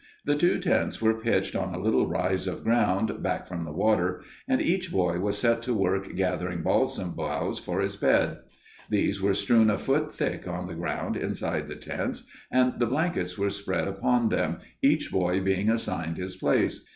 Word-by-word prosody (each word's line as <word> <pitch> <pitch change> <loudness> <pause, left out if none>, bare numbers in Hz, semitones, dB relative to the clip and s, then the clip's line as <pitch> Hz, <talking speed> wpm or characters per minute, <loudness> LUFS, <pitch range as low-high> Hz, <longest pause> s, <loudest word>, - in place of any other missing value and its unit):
The - - +3
two 175 +5 +3
tents - - 0
were 110 0 +3
pitched 115 - +1
on 95 -1 -2
a - - -4
little 110 +4 +2
rise 90 +2 0
of 90 - -4
ground 110 -2 +1
back - - -1
from 85 -2 -5
the 75 - -6
water, 90 +1 +1 0.2
and 260 -1 +2
each 185 0 0
boy 90 -2 +1
was 100 +2 0
set 115 +1 +2
to 120 0 -1
work 95 -1 0
gathering 90 -2 -1
balsam 90 -2 +1
boughs 75 -2 -2
for 90 +2 -2
his 100 0 -1
bed. - - +2 0.5
These 100 -1 +1
were 100 0 +2
strewn 110 +1 +4
a 105 - +2
foot 150 +3 0
thick 150 -10 -3
on 90 +1 -4
the 90 - -6
ground 85 +1 -3
inside - - -2
the - - -7
tents - - -4 0.3
and 125 0 +2
the 120 - +2
blankets 130 - -1
were 100 0 0
spread 100 -2 -2
upon 115 +4 +1
them, - - -1 0.2
each - - +2
boy 90 0 +1
being 95 +2 +1
assigned 85 -7 -1
his 95 0 -5
place. 95 - +1
95 Hz, 190 wpm, -27 LUFS, 90-115 Hz, 0.5 s, strewn